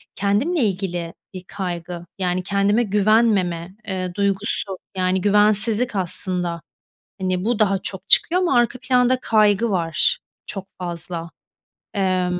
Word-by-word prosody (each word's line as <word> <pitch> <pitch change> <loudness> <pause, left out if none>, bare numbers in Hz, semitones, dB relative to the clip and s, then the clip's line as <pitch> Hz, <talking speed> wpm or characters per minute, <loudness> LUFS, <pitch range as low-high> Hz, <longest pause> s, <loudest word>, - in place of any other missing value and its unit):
kendimle 215 - 0
ilgili 180 -4 -2 0.2
bir 185 -1 -8
kaygı, 175 -2 -5
yani, 180 -1 -1
kendime 200 +4 +2
güvenmeme, 200 -4 +1
eee, 185 -2 -3
duygusu. 200 -1 0 0.2
Yani 185 0 +1
güvensizlik 210 +3 +3
aslında. 180 -2 -1 0.6
Hani, 185 0 -1
bu 235 0 0
daha 195 -2 +2
çok 190 0 -7
çıkıyor 360 +2 +5
ama 365 -1 +1
arka 240 +1 +2
planda 250 0 +3
kaygı 215 0 +3
var 165 -4 +1 0.3
çok 195 -2 -6
fazla. 170 -1 -4 0.6
Emm, 185 -2 0
195 Hz, 120 wpm, -21 LUFS, 180-215 Hz, 0.6 s, çıkıyor